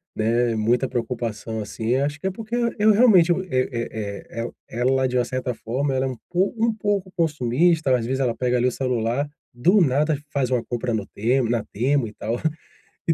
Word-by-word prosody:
né. 115 +1 +1
Muita 120 +4 +1
preocupação, 115 -2 -3
assim, 110 +3 -2
acho 145 +2 -1
que 190 - -2
é 190 - 0
porque 225 +4 -5 0.2
eu 215 +1 +6
realmente 200 -6 +6 0.2
é 130 0 +1 0.7
é - - 0
é - - -2 0.3
é 120 - -6
ela 130 +1 +2
de 125 0 -1
uma 125 - +2
certa 130 0 -3
forma 135 +5 -2
ela 130 0 +1
é - - 0
um 125 - -6
pouco 195 +5 +1
um 230 - +1
pouco 200 -3 -1
consumista, 155 -1 +2
às 115 -2 -1
vezes 130 +2 -1
ela 120 -3 +1
pega, 125 -1 0
ali, 125 +1 +2
o - - +1
celular, 125 +2 -1 0.3
do 180 - +4
nada 150 +1 +2
faz 130 -2 0
uma 125 -2 +1
compra 120 0 -3
no 105 -3 -1
Temu 120 +2 0
na 120 -3 0
Temu 130 +2 0
e 105 - -10
tal. 115 +3 -3 0.7
E 165 - +4
130 Hz, 205 wpm, -23 LUFS, 120-155 Hz, 0.7 s, eu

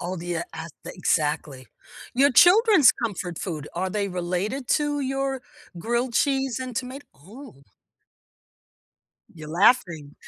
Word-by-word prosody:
Oh, 180 +1 -4
do 170 0 -8
you 175 -1 -2
ask 160 -1 -8
the - - -8
exactly. 150 -6 -1 0.5
Your 275 +3 +4
children's 375 - +6
comfort 185 -7 -5
food, 155 -6 -5
are 185 +2 -2
they 200 0 -2
related 185 +8 -3
to 295 -1 0
your 270 -1 -2 0.4
grilled 235 +6 -2
cheese 270 -2 0
and 255 -1 -6
tomat 260 +3 -5
oh 200 - -14 1.7
you're 155 -2 -11
laughing. 170 - +2
210 Hz, 130 wpm, -24 LUFS, 170-265 Hz, 1.7 s, children's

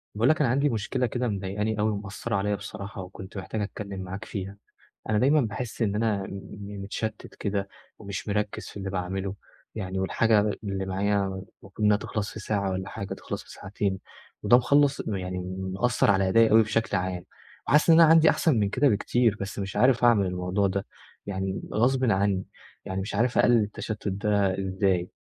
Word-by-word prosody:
باقول 115 +6 +3
لك 155 - +3
أنا 135 - +3
عندي 140 +3 +2
مُشكِلَة 125 +2 -1
كِدَه 125 +2 -2
مضايِقانِي 105 +1 -2
أوي، 110 +1 +2
ومُأثِّرَة 105 +2 -4
عَلَيَّ 100 +1 0
بِصَراحة، 100 -1 -7
وكنت 95 +3 -9
محتاج 105 +3 -4
أتكَلَّم 100 -1 -5
معاك 95 +3 -6
فيها.أنا 100 +2 -5
دايمًا 145 +5 +4
باحِسّ 115 +1 -4
إن 105 -3 +1
أنا 105 -2 0
م - - -7 0.3
م 100 -1 -7
متشتِّت 110 +2 -5
كِدَه، 100 -1 -2 0.3
ومِش 100 -1 -6
مُرَكِّز 105 0 -2
في - - -9
اللِّي 95 -1 -4
باعمَلُه. 95 +1 -3 0.4
يعني 95 -3 -3
والحاجة 110 +3 +3 0.2
اللِّي 95 -2 -3
معايا 100 +1 +1 0.4
المَفروض 95 - -15
إنها 105 -1 +5
تِخلَص 105 0 -4
في - - -7
ساعة، 100 -3 -1 0.4
تِخلَص - - -6
في - - -15
ساعتين، 95 0 -3 0.4
وده 120 - +7
مخلص 140 +2 +3
يعني 90 -2 -3 0.3
مُأثِّر 120 +2 +2
على 95 -1 +2
أدائِي 115 +2 +6
بِشكل 110 -1 0
عام. 90 -1 -3 0.4
وحاسِس 150 +3 +4
إن 165 0 +8
أنا 165 - +7
عندي 160 -1 +7
أحسن 150 -9 +2
مِن 100 -1 +1
كِدَه 135 +7 +3
بِكتير، 115 +1 +2
بس 100 +1 -5
مِش 100 0 -4
عارِف 125 +2 +4
أعمَل 115 -5 +5
الموضوع 90 +2 0
ده. 95 +1 -2 0.4
يعني 95 -1 -3
غَصبًا 125 0 +3
عنِّي، 95 -1 +1 0.4
ومِش 95 +2 -3
عارِف 120 +4 +1
أقَلِّل 120 -3 +5
التَّشتُّت 105 +1 -5
ده 100 -1 +1
إزاي. 95 -2 +1
105 Hz, 170 wpm, -26 LUFS, 95-115 Hz, 0.4 s, إن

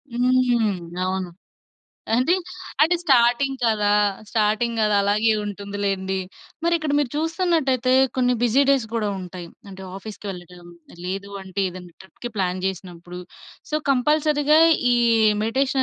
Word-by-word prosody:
హ్మ్. 245 -5 +2 0.3
అవును. 185 -1 -2 0.9
అంటే, 255 +9 +3 0.5
అంటే 330 +3 +4
స్టార్టింగ్ 265 -1 +3
కదా! 210 -2 +2 0.4
స్టార్టింగ్ 220 +2 0
కదా! 210 -1 +2
అలాగే 210 +3 +2
ఉంటుంది 205 0 -6
లేండి. 190 -1 -1 0.5
మరిక్కడ 330 -3 +1
మీరు 285 -4 0
చూస్తున్నట్టయితే 315 -6 +1 0.2
కొన్ని 250 -1 +2
బిజీ 245 +4 +3
డేస్ 265 -5 +2
కూడా 220 -2 0
ఉంటాయి. 180 -1 -8 0.2
అంటే 190 -1 -10
ఆఫీస్‌కి 205 +1 -9
వెళ్ళడం, 175 -1 -11 0.4
లేదు 195 +2 -5
అంటే 190 +1 -5
ఏదైనా 180 -1 -11
ట్రిప్‌కి 240 +5 -9
ప్లాన్ 185 -1 -1
చేసినప్పుడు, 180 -2 -7 0.5
సో, - - -2 0.2
కంపల్సరీ‌గా 300 +2 +3 0.3
ఈ - - +4 0.5
మెడిటేషన్ 265 +4 +1
225 Hz, 120 wpm, -22 LUFS, 190-265 Hz, 0.9 s, అంటే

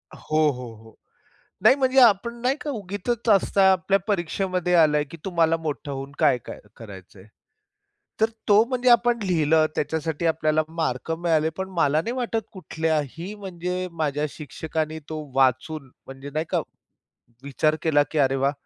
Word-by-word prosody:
हो, 155 - -3
हो, 125 -3 -8
हो. 110 - -17 0.7
नाही 240 +5 +7
म्हणजे, 265 -1 +3
आपण 235 0 +4
नाही 260 +3 +1
का 300 - -4
उगीचच 220 +1 -3
असता 195 -1 +3
आपल्या 190 +2 +2
परीक्षेमध्ये 180 -1 -1
आला 150 -3 +4
की 165 - -9
तुम्हाला 165 -3 +2
मोठं 150 -2 -5
होऊन 135 +1 -6
काय 145 -5 +4
काय - - -8 0.2
करायचंय? 95 -3 -12 1.0
तर 220 - +5 0.2
तो 210 +1 +6
म्हणजे 250 0 0
आपण 240 0 +4
लिहिलं 160 -4 +2
त्याच्यासाठी 160 +2 -2
आपल्याला 155 -1 +1
मार्क 160 -3 -3
मिळाले. 160 -2 +1
पण 190 0 -4
मला 150 0 +3
नाही 230 +7 -3
वाटत 230 -3 -2
कुठल्याही 160 +1 -3
म्हणजे 180 -2 -4
माझ्या 150 -2 -1
शिक्षकांनी 155 +2 -4
तो 155 -1 -5
वाचून 135 +2 +1 0.2
म्हणजे, 135 +1 -9
नाही 155 +2 -2
का, - - +1 0.8
विचार 155 +3 0
केला 145 -3 +3
की 155 - -2
"अरे 135 -1 +3
वाह! 135 +2 +1
160 Hz, 150 wpm, -24 LUFS, 150-195 Hz, 1.0 s, नाही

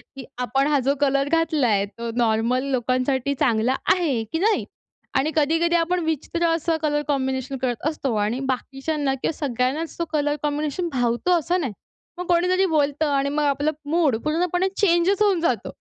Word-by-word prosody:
की 265 - -8 0.2
आपण 270 +3 +1
हा 290 -2 +3
जो 280 - +3
कलर 275 0 +2
घातला 320 -5 +2
आहे, 200 -2 +2
तो 230 +3 -7
नॉर्मल 235 +2 +1
लोकांसाठी 255 +2 0
चांगला 245 -2 +2 0.2
आहे, 290 -11 0
की 320 +10 -4
नाही? 430 +3 +2 0.5
आणि 300 +4 +1
कधी-कधी 330 +3 +2
आपण 345 +2 +1
विचित्र 330 +2 -1
असं 330 0 0
कलर 295 -1 +1
कॉम्बिनेशन 265 -1 -1
करत 255 +2 -1
असतो. 275 -6 -3
आणि 215 +4 0
बाकीच्यांना 270 +2 -2
किंवा - - 0 0.2
सगळ्यांनाच 260 +6 -1
तो 335 - 0
कलर 295 0 +1
कॉम्बिनेशन 300 +4 -1
भावतो 245 +7 0
असं 350 +3 0
नाही. 255 -9 -3 0.4
मग 360 - -4
कोणीतरी 365 +2 +3
बोलतं 300 -2 +1
आणि 275 0 +1
मग 300 +1 0
आपलं 290 +2 +1 0.2
मूड 315 -6 +2
पूर्णपणे 355 +4 0
चेंजच 375 +1 +3
होऊन 400 -4 +3
जातो. 340 - -1
290 Hz, 165 wpm, -23 LUFS, 260-330 Hz, 0.5 s, हा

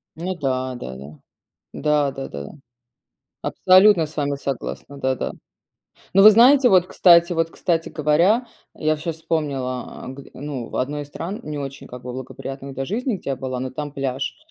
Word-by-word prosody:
Ну 180 +3 -4
да, 130 -4 -2
да-да. 70 - -9 0.5
Да-да-да. 135 - -1 0.9
Абсолютно 185 -2 +5
с 155 - -12
вами 145 -1 -1
согласна. 140 +1 -5
Да-да. 130 -2 -1 0.8
Ну, 195 +1 +6
вы 215 - +12
знаете, 250 +4 +6
вот 185 -2 +5
кстати 170 -1 +5
вот, 165 0 0
кстати 165 -2 -1
говоря, 170 - +2 0.3
я 155 0 0
вообще 155 +2 -2
вспомнила, 140 -6 -2 0.2
а, 130 - -7
к 140 - -10
ну, 135 -4 -6
в - - -8
1 145 +3 -2
из - - -13
стран, 175 +7 -6
не 150 -1 -5
очень 140 -1 -7
как 125 0 -10
бы 125 0 -6
благоприятных 135 +1 -7
для 135 +1 -3
жизни, 235 - -1
где 140 - -5
я - - -1
была, 130 -1 -4
но 130 0 -4
там 145 +2 -5
пляж. 135 -1 -3
145 Hz, 165 wpm, -22 LUFS, 130-170 Hz, 0.9 s, вы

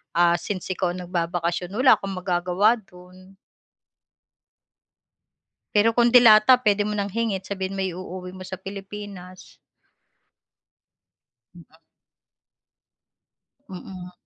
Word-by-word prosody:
ah, 175 0 +4
since 190 -1 -5
ikaw 185 -1 -1
ang 180 - -7
nagbabakasyon, 175 +1 -3
wala 255 +3 +5
kang 195 -1 -5
magagawa 185 +5 +1
do'n. 185 0 -18 2.4
Pero 210 +2 +4
kung 240 0 +4
delata, 240 0 +7
puwede 210 -3 +2
mo 210 - -3
nang 200 -1 -2
hingin, 215 -2 -2
sabihin 190 0 -5
mo - - -2
iuuwi 185 0 -6
mo 185 - -9
sa 185 -1 -8
Pilipinas. 195 -1 -10 2.0
Mm. 165 -1 -18 1.9
Mm. 180 -1 -9
190 Hz, 100 wpm, -23 LUFS, 180-205 Hz, 2.4 s, delata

